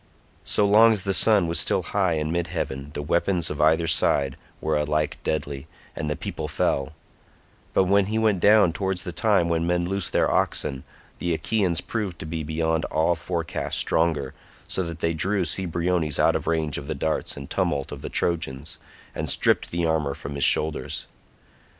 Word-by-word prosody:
So 105 - +2
long 110 +3 +6
as 100 -3 -3
the 100 -1 0
sun 100 +1 +4
was 85 0 +1
still - - +1
high 95 -4 0
in 75 0 -2
mid 85 0 -1
heaven 70 -3 -4
the 75 - -3
weapons 85 +2 +1
of 75 - -3
either 80 +2 +4
side 70 -4 +2 0.2
were 80 - -1
alike 75 0 -1
deadly, 70 -3 -3 0.3
and 75 - -3
the 75 - -1
people - - -5
fell; 70 +3 -1 0.8
but - - +5
when 100 +1 +3
he 110 +2 -1
went 110 -4 +2
down 105 -3 +5
towards 95 -1 -2
the 90 - -5
time 100 -2 +2
when 85 0 0
men 90 0 +1
loose 95 0 -2
their - - +2
oxen, 70 -3 -1 0.4
the 85 -1 0
Achaeans 90 -2 0
proved 105 -7 -4
to - - -7
be 80 +1 -4
beyond 80 +1 -1
all 80 +2 +1
forecast 85 0 -3
stronger, 80 -5 +1 0.3
so - - -1
that 85 -2 -5
they 85 - +1
drew 95 +3 0
Cebriones 85 -3 0
out - - +3
of - - -3
range 80 -3 0
of 70 - -10
the 80 - -3
darts 80 +2 -2
and 70 -1 -7
tumult 70 -2 -1
of - - -7
the - - -5
Trojans, 80 -4 -2 0.3
and - - -4
stripped - - +2
the 85 0 -1
armour 75 -4 0
from 70 - -7
his 70 -1 0
shoulders. 75 +3 +1
85 Hz, 185 wpm, -24 LUFS, 75-95 Hz, 0.8 s, long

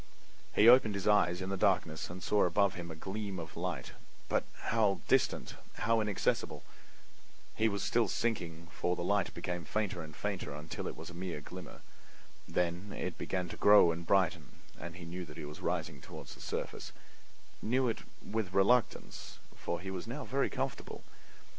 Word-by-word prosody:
He 105 - +7
opened 120 -4 +8
his 100 0 -2
eyes 90 -3 +4
in 95 - -3
the 100 - -1
darkness 80 -3 +1
and 90 +1 -7
saw 105 -1 +4
above 95 +2 +3
him 85 -2 -6
a 80 - -6
gleam 100 +3 -4
of 80 -2 -7
light, 85 -7 -3 0.4
but - - +1 0.3
how 105 -6 +3
distant, - - +2 0.2
how 115 +1 +2
inaccessible! 105 -3 0 0.9
He 110 0 +3
was 100 -1 -2
still 120 -1 +3
sinking, 85 -8 -2
for 90 - 0
the 85 - -3
light 100 0 +2
became 90 -1 -3
fainter 95 0 -1
and 80 -2 -9
fainter 95 -8 -3
until 75 +2 -5
it - - -5
was 80 +2 -8
a - - -11
mere 90 -2 -4
glimmer. 90 +4 -9 0.7
Then 90 +3 -1
it - - -4
began 90 -1 -1
to - - -7
grow 105 -4 +8
and 85 +1 -4
brighten, 85 -6 +2 0.3
and 85 0 -7
he 90 -2 -8
knew 90 +2 -5
that 75 - -11
he - - -5
was 75 +1 -8
rising 70 - -2
toward - - -9
the - - -10
surface—knew 130 +3 -4
it 115 - 0 0.3
with 105 -4 -2
reluctance, 115 +6 +2 0.2
for 85 - -3
he 95 +2 -5
was 95 +2 -5
now 135 +5 -4
very 135 +1 +1
comfortable. 135 -1 -4
95 Hz, 175 wpm, -33 LUFS, 85-105 Hz, 0.9 s, opened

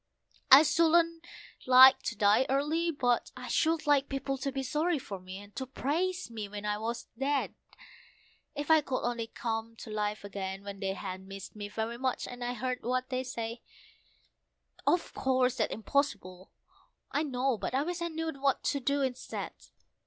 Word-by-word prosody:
I 270 +3 +11
shouldn't 335 +1 +3 0.4
like 260 +1 +9
to 230 - -2
die 210 +5 +4
early, 300 +5 +1
but 250 -6 +1
I 250 0 -7
should 320 +6 +1
like 285 -2 +3
people 275 0 -2
to 275 +1 -2
be 270 0 -3
sorry 310 +5 0
for 200 -7 -7
me, 185 +1 -9
and 205 +1 -13
to 260 - -3
praise 345 +5 -2
me 215 -3 -5
when 205 0 -6
I 210 0 -1
was 230 +2 -3
dead: 280 +1 0 1.0
If 290 +2 -1
I 315 -1 +7
could 260 -3 -3
only 235 -1 -2
come 225 0 -4
to 220 - -9
life 210 0 -2
again 195 -1 -5
when 200 -1 -7
they 195 -1 -1
had 190 -1 -6
missed 195 +1 -9
me 205 -1 -6
very 225 +3 -3
much, 260 -1 -1
and 245 0 -7
I'd 245 0 -3
heard 255 0 -2
what 255 +1 -1
they 255 -1 -1
said 230 -2 -5 1.3
Of 350 - +2
course 255 -1 +1
that's - - 0
impossible, 205 -7 -2 0.6
I 290 - +1
know, 260 -5 0
but 255 - -3
I 275 - +2
wish 345 +2 -4
I 340 - 0
knew 325 0 -3
what 275 -1 0
to 280 - 0
do 280 +2 0
instead! 255 -2 -4
255 Hz, 180 wpm, -30 LUFS, 220-285 Hz, 1.3 s, I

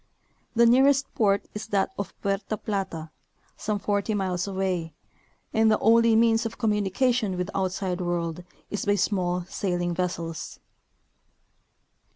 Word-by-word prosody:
The 235 +1 +6
nearest 270 +3 +4
port 200 -2 +2
is 210 0 -6
that 200 -3 +1
of 200 -2 -6
Puerta 200 +2 -1
Plata, 190 -7 -4 0.4
some 210 0 -2
forty 205 +2 -1
iniles 185 -2 -1
away, 185 -4 -2 0.6
and 220 0 +4
the 215 - +4
only 230 +1 +5
means 225 0 +4
of 225 0 -5
communication 210 0 +1
with 180 - -1
the - - -5
outside 185 -1 -2
world 175 -1 -2 0.3
is 205 - -2
by 205 0 +2
small 180 -3 0
sailing 175 -1 -2
vessels. 170 -2 -4
200 Hz, 135 wpm, -26 LUFS, 180-220 Hz, 0.6 s, The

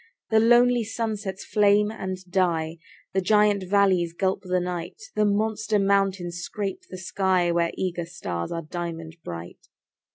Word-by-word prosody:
The 220 - +6
lonely 240 +1 +5
sunsets 215 -3 -4
flame 210 0 +3
and 190 -4 -4
die; 170 -3 0 0.4
The 190 - +2
giant 210 +1 +3
valleys 190 -4 +3
gulp 190 +2 0
the 185 -1 0
night; 180 - -4 0.2
The 210 - +3
monster 215 +1 +1
mountains 195 -3 +1
scrape 195 +2 -4
the 185 - -7
sky, 185 -2 +1
Where 170 0 +2
eager 175 -2 -2
stars 90 - -4
are 165 0 -3
diamond 165 0 -6
bright. 85 0 -8
190 Hz, 140 wpm, -25 LUFS, 175-210 Hz, 0.4 s, The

